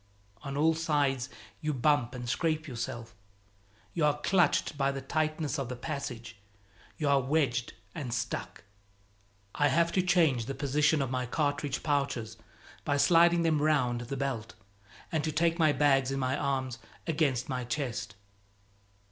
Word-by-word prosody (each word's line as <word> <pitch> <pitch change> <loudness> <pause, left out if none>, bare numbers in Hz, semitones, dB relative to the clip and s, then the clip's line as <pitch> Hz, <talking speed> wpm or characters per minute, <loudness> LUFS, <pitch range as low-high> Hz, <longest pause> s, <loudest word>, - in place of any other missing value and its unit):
On 140 0 -5
all 160 +2 +4
sides 145 -6 0 0.3
you 150 -1 -1
bump 130 -1 +2
and 125 -1 -6
scrape 155 +6 0
yourself, 115 -2 -5 0.8
you 165 - -1
are 150 -1 +3
clutched 175 -2 +2
by 140 -1 +1
the 135 - -4
tightness 155 +1 -1
of 135 -3 -3
the 125 - -4
passage, 125 -5 -6 0.6
you 150 - -1
are 140 -1 +4
wedged 130 -3 0 0.2
and 145 -8 -5
stuck. 120 - -4 0.9
I 145 - +3
have 170 +5 +2
to 185 - +2
change 160 -10 +2
the 135 - -3
position 145 +2 +2
of 130 - -4
my 125 -1 -1
cartridge 145 0 -1
pouches 140 -7 -1 0.5
by 145 -1 +1
sliding 170 +2 +5
them 155 -3 +2
round 130 -6 +2
the 125 +3 -5
belt 130 -5 -3 0.6
and 160 -2 0
to 155 - -1
take 165 +2 +1
my 155 -2 +5
bags 135 -2 +3
in 135 - -2
my 130 0 0
arms 130 -4 -2 0.3
against 145 -6 0
my 130 -1 -2
chest. 120 -4 -3
140 Hz, 155 wpm, -30 LUFS, 125-155 Hz, 0.9 s, sliding